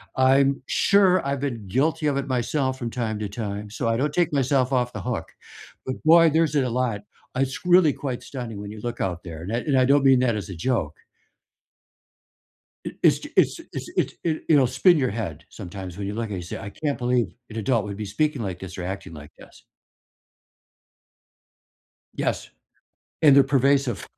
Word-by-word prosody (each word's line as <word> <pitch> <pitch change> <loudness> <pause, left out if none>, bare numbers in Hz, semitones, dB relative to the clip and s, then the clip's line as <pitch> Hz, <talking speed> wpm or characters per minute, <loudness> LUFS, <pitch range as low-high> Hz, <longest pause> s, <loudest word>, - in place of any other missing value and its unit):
I'm 135 +1 +3
sure 190 -4 +3
I've 140 0 -1
been 115 -8 -4
guilty 150 - +1
of 140 -1 +1
it 140 - -2
myself 130 +1 -1
from 120 - -3
time 110 -3 -3
to 105 -2 -4
time, 105 -1 -5
so 115 +2 -3
I 115 0 +1
don't 145 +3 -1
take 170 -3 +1
myself 135 -1 +1
off 125 -1 0
the - - -5
hook. 125 -3 -3 0.6
But, 130 - -5
boy, 165 +1 +7
there's 160 -1 +2
it 140 - +3
a 125 - -1
lot. 120 -4 -1 0.3
I 130 - 0
it's 135 +5 -3
really 175 -4 +5
quite 130 -4 -5
stunning 120 -6 -7
when 100 0 -7
you 110 - -9
look 120 0 -5
out 90 -2 -3
there, 80 -2 -8
and 100 +5 -5
I - - +1
and 135 +1 0
I 130 - +4
don't 140 +1 +4
mean 135 -2 +5
that 120 -4 +2
as 100 -4 -5
a 95 - -6
joke. 80 - -1 1.9
It - - -6
it's - - +5
ju - - -9
it's - - +4
ju - - -11
it's - - -6
it - - +1
it 160 -2 -1
you 155 - +6
know, 135 - +5
spin 130 +8 +4
your 130 -4 +1
head 90 -8 -5
sometimes 95 -2 -8
when 100 - -4
you 100 - -4
look 115 0 -3
and 100 - -3
you 90 - -5
say, 85 - -6
"I 100 - -7
can't 145 +3 -3
believe 120 -5 0 0.2
an 110 - -9
adult 115 +1 +1
would 100 -1 -6
be 105 -1 -5
speaking 145 +4 -1
like 95 -3 -4
this 95 0 -9
or 90 - -4
acting 95 -2 -6
like 75 0 -11
this." - - -17 2.5
Yes, - - -2 0.7
and 140 -3 +7
they're 140 - +8
pervasive. 135 -5 +1
125 Hz, 210 wpm, -24 LUFS, 105-140 Hz, 2.5 s, they're